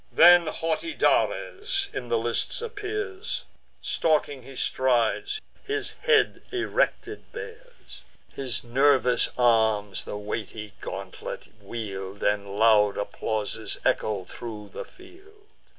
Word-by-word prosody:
Then 175 0 +8
haughty 165 - -2
Dares 395 0 +1
in 125 - -5
the 115 - +3
lists 115 +1 -1
appears; 415 -2 -4 0.4
Stalking 150 -4 +1
he 135 +2 -12
strides, 120 - +1 0.2
his 425 0 -2 0.2
head 440 -3 +4
erected 400 +2 -1
bears: - - -10 0.3
His 130 -3 -1
nervous 130 +1 +3
arms 110 -4 +3
the 105 - -5
weighty 105 0 -5
gauntlet - - -6
wield, 100 -4 -6
And 100 -1 0
loud 105 -2 +5
applauses 105 +1 -2
echo 105 -3 +1
thro' 105 0 -8
the - - -5
field. 400 +3 -17
125 Hz, 105 wpm, -26 LUFS, -, 0.4 s, Then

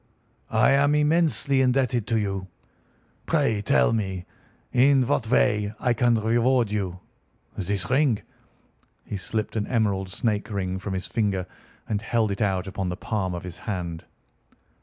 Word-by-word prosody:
"I 110 +4 +5
am 140 +2 +4
immensely 150 -3 +2
indebted 125 -3 +1
to 115 - +1
you. 95 -3 -2 0.8
Pray 140 -10 +1
tell 65 - +3
me 95 -5 -2 0.5
in 130 +1 +5
what 120 -4 0
way 105 -3 +2
I 125 -2 +2
can 120 0 +3
reward 115 +1 +2
you. 95 -3 -3 0.5
This 100 -1 -2
ring—" 130 -4 +2 0.8
He - - -5
slipped 105 +6 -3
an 105 -2 -1
emerald 100 -5 0
snake 105 +2 -1
ring 95 -2 -2
from 95 0 -4
his 95 - -3
finger 100 -5 -1 0.4
and 105 -1 -1
held 110 -1 0
it 100 - -4
out 95 -3 +1
upon 95 -1 -3
the 90 - -4
palm 95 -4 -2
of 85 - -6
his 90 -2 -8
hand. 85 -4 -4
105 Hz, 150 wpm, -25 LUFS, 95-125 Hz, 0.8 s, I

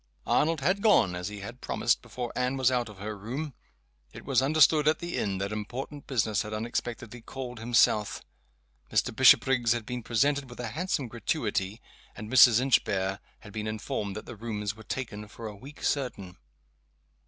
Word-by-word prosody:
Arnold 160 0 +2
had 185 +8 +1
gone, 200 - +4
as 90 0 -4
he 105 -1 -7
had 115 +6 -9
promised, 120 - +1
before 120 -2 -6
Anne 125 +1 0
was 130 -1 +3
out 120 -3 0
of 105 - -12
her 105 +2 -5
room. 130 +9 -5 0.6
It - - -11
was - - +3
understood 150 +2 +4
at 155 - +4
the 170 0 -5
inn 100 -2 -1
that 100 +2 -3
important 125 +7 -6
business 110 -6 +1
had 105 -1 -6
unexpectedly 120 +1 -4
called 125 0 -7
him 120 +1 -3
south. 105 -4 +3 0.7
Mr. - - +1
Bishopriggs 120 -3 +5
had 120 -2 -4
been 125 +1 -4
presented 135 +4 +1
with 120 - -11
a 120 -2 -3
handsome 155 - -2
gratuity; 110 - -2 0.3
and 105 +1 -8
Mrs. 120 -2 +8
Inchbare 95 -7 +1 0.2
had 105 -3 -12
been 110 0 -3
informed 105 -2 -3
that 110 - -7
the 120 - -8
rooms 105 -2 -4
were 110 - -13
taken 110 -3 -5
for 115 +2 -10
a 105 -1 -6
week 140 +9 -12
certain. 100 -10 -2
115 Hz, 180 wpm, -28 LUFS, 105-130 Hz, 0.7 s, Mrs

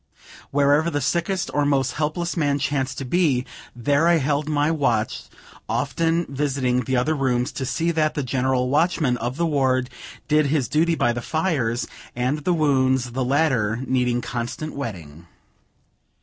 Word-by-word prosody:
Wherever 145 +3 +3
the 145 - -1
sickest 170 +6 -1
or 145 - +2
most 135 -3 +1
helpless 155 +4 -2
man 145 -4 +1
chanced 135 -1 -1
to 135 - -4
be, 135 -4 +1 0.3
there 140 +7 +2
I 170 - +5
held 145 +1 0
my 150 +1 +2
watch, 120 -8 0 0.4
often 165 +1 0
visiting 135 -3 -1
the 130 - 0
other 130 +6 +1
rooms, 130 -2 0
to 130 - -4
see 165 +5 0
that 155 -2 0
the 145 - -1
general 130 0 0
watchman 150 -3 +2
of 120 +3 -4
the 170 - +1
ward 130 -4 +1 0.4
did 150 -1 +3
his 140 -3 +1
duty 165 +2 +2
by 120 -6 +1
the 120 - -4
fires 135 -8 -1 0.3
and 125 +5 0
the 165 +5 -1
wounds, 130 -5 +2
the 130 +2 -1
latter 125 -6 +1
needing 125 -2 +1
constant 120 +6 -4
wetting. 85 - -7
140 Hz, 160 wpm, -23 LUFS, 125-155 Hz, 0.4 s, I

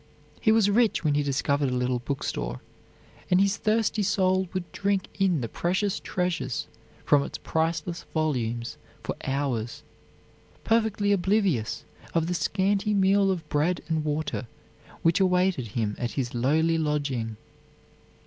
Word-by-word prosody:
He 220 - +4
was 220 -2 +4
rich 220 0 +3
when 150 -2 +2
he 145 - +2
discovered 140 0 +1
a 125 - -1
little 125 0 0
bookstore, 65 - -3 0.7
and 180 - +4
his 200 +1 +3
thirsty 215 0 +1
soul 190 -2 +2
would 185 -2 -4
drink 200 -1 0
in 185 -7 +2
the 115 - -2
precious 190 - -1
treasures 180 -8 -2 0.4
from 145 - +5
its - - -5
priceless 165 +2 -1
volumes 120 -7 -1 0.3
for - - -3
hours, 135 -4 -2 0.8
perfectly 220 -3 +2
oblivious 190 - +1 0.3
of 165 -1 +3
the 175 - -1
scanty 195 +5 +1
meal 195 0 +4
of 180 -4 -2
bread 160 +4 +1
and 160 -1 0
water 150 -4 -2 0.6
which 165 +2 +4
awaited 180 -8 +2
him 105 -3 0
at 120 -1 -2
his 125 -3 -2
lowly 160 +7 +2
lodging. 140 -8 -1
165 Hz, 140 wpm, -27 LUFS, 135-195 Hz, 0.8 s, from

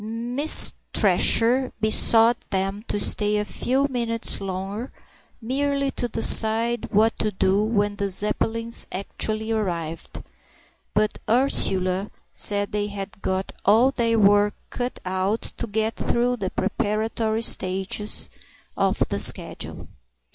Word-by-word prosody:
Miss 240 +7 +4 0.2
Thresher 250 +3 +3
besought 225 +2 +3
them 195 +2 -3
to 205 - -3
stay 210 0 +3
a 210 - -2
few 265 +6 -2
minutes 235 -5 0
longer, 195 +5 -6 0.5
merely 275 +3 -2
to 245 - -3
decide 225 +1 +4
what 220 +2 +1
to 215 - -1
do 190 +1 0
when 205 -2 -2
the 200 -1 -3
Zeppelins 225 +4 -1
actually 215 +3 -4
arrived. 170 -7 -5 0.7
But 210 0 -1
Ursula 195 -6 +2 0.2
said 205 -1 +2
they 205 0 -3
had 195 -1 -9
got 190 +1 -3
all 225 +6 +3
their 230 -3 -1
work 205 0 +2 0.2
cut 245 0 -5
out 190 +4 -2 0.2
to - - -5
get 220 +1 -3
through 245 +1 -1
the 190 -4 -4
preparatory 220 +3 -3
stages 190 +1 0 0.5
of - - -1
the - - -2
schedule. - - +1
215 Hz, 120 wpm, -22 LUFS, 200-230 Hz, 0.7 s, Miss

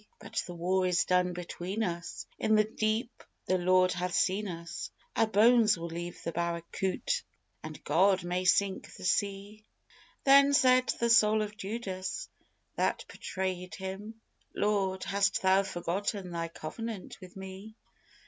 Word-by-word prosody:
But - - -3
the 175 - -7
war 185 +2 +1
is 180 -1 +2
done 180 0 +2
between 180 +4 -4
us, 175 -3 -4
In 220 - +3
the 215 - +5
deep 220 +2 -2 0.2
the 185 0 +1
Lord 185 +1 +4
hath 180 0 -2
seen 200 +3 +1
us 170 -2 -6 0.3
Our 225 - +3
bones 220 -1 +5
we'll 170 0 -5
leave 170 +1 -6
the 165 - -2
barracout', 170 - -2 0.4
and 155 -1 -9
God 185 +5 +3
may 180 +1 -1
sink 195 +1 +2
the - - -11
sea!" 200 +2 -1 0.6
Then 280 +1 +6
said 255 -1 +4
the 235 0 +2
soul 215 -1 +5
of 210 0 -6
Judas 195 -3 -4 0.5
that - - 0
betrayèd 185 -1 -4
Him: 200 +4 -7 0.4
"Lord, 195 -2 0
hast 200 0 +1
Thou 190 +1 +5
forgotten 190 +1 -3
Thy 165 -1 -2
covenant 190 +5 -7
with 185 -1 -12
me? 190 +3 -9
190 Hz, 145 wpm, -30 LUFS, 180-215 Hz, 0.6 s, Then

